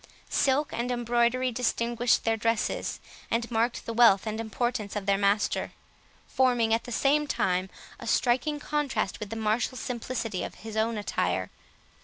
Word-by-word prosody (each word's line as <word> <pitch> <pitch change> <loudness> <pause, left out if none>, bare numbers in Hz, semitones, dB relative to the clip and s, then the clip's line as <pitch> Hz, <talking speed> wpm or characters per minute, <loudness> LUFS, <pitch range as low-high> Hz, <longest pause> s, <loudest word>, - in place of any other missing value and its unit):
Silk 280 +2 +2
and 240 +1 -2
embroidery 240 +1 +1
distinguished 240 0 +1
their 225 0 +2
dresses, 225 0 -1 0.3
and 235 +1 -1
marked 235 +1 0
the 230 - -4
wealth 225 -4 +5
and 220 0 -3
importance 225 -1 -2
of 205 -2 -3
their 200 0 +3
master; 200 +1 +1 0.5
forming, 245 -4 +2
at 225 - 0
the 245 - -7
same 290 +5 +2
time, 185 -6 0 0.3
a - - -8
striking 260 +5 +1
contrast 290 -8 -1
with 210 - -6
the 225 - -5
martial 225 +4 0
simplicity 235 -5 -3
of - - -6
his 220 0 -9
own 220 +1 +1
attire. 95 - -1
230 Hz, 155 wpm, -28 LUFS, 215-245 Hz, 0.5 s, wealth